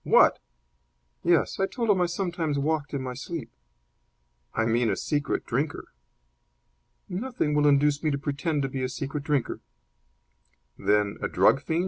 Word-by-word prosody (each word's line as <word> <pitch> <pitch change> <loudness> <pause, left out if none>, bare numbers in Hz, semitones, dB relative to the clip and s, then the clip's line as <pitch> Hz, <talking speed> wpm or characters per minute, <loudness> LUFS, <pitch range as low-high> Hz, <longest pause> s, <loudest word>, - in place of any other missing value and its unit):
"What!" - - +5 0.8
"Yes; 170 -4 +2
I 195 - +2
told 230 -1 0
him 190 -3 +2
I 175 - +3
sometimes 170 -4 -2
walked 145 0 -1
in 135 - -2
my 130 -1 -4
sleep." 135 -2 -6 1.0
"I 110 - +2
mean 115 0 +2
a - - +1
secret 145 -1 -1
drinker." 140 +5 -2 1.2
"Nothing 200 -4 -2
will 150 0 +4
induce 145 +1 +3
me 155 - +1
to 140 - 0
pretend 145 +2 -1
to - - 0
be 130 0 -4
a 130 - -1
secret 140 +2 -4
drinker." 145 -4 0 1.2
"Then 105 -1 +1
a - - 0
drug 135 - +4
fiend?" 160 +2 -1
145 Hz, 155 wpm, -27 LUFS, 135-165 Hz, 1.2 s, What